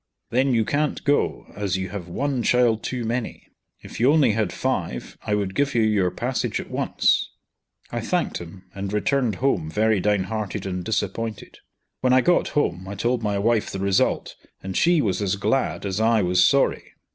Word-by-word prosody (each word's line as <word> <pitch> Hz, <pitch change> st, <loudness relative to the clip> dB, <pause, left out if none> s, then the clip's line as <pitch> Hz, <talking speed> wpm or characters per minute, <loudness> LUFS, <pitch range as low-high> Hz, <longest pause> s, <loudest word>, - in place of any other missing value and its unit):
"Then 130 Hz, +3 st, +2 dB
you 110 Hz, -1 st, +2 dB
can't 150 Hz, +4 st, -1 dB
go, 145 Hz, 0 st, +1 dB
as 100 Hz, -2 st, -1 dB
you 95 Hz, -1 st, -4 dB
have 95 Hz, -2 st, -6 dB
one 135 Hz, +7 st, -1 dB
child 120 Hz, -2 st, +3 dB
too 125 Hz, -2 st, -3 dB
many. 120 Hz, +1 st, -3 dB, 0.4 s
If -, -, -9 dB
you 125 Hz, +4 st, +5 dB
only 150 Hz, -6 st, +4 dB
had 105 Hz, -3 st, 0 dB
five 60 Hz, 0 st, -3 dB
I 105 Hz, -, -1 dB
would 100 Hz, -2 st, -2 dB
give 140 Hz, +3 st, 0 dB
you 115 Hz, -, +4 dB
your 105 Hz, -4 st, +2 dB
passage -, -, -2 dB
at -, -, -8 dB
once." -, -, +1 dB, 0.6 s
I -, -, -2 dB
thanked -, -, -1 dB
him, 90 Hz, +2 st, -11 dB
and 100 Hz, 0 st, -5 dB
returned 120 Hz, +1 st, +1 dB
home 125 Hz, -, 0 dB
very 110 Hz, +4 st, +2 dB
downhearted 105 Hz, +1 st, -1 dB
and 90 Hz, -2 st, -3 dB
disappointed. 110 Hz, +1 st, -3 dB, 0.4 s
When 130 Hz, -1 st, +2 dB
I 130 Hz, -, +6 dB
got 175 Hz, +6 st, +2 dB
home, 95 Hz, -10 st, 0 dB
I 100 Hz, -, -5 dB
told 120 Hz, +4 st, 0 dB
my 105 Hz, -2 st, -1 dB
wife 110 Hz, +2 st, +1 dB
the -, -, -5 dB
result, 95 Hz, 0 st, +1 dB, 0.3 s
and 95 Hz, -1 st, -5 dB
she 170 Hz, -2 st, +3 dB
was 100 Hz, -2 st, -1 dB
as 100 Hz, -1 st, 0 dB
glad 110 Hz, +3 st, -1 dB
as 100 Hz, +1 st, -2 dB
I 110 Hz, -2 st, +3 dB
was 90 Hz, 0 st, +3 dB
sorry. 140 Hz, -, +2 dB
110 Hz, 185 wpm, -23 LUFS, 95-125 Hz, 0.6 s, I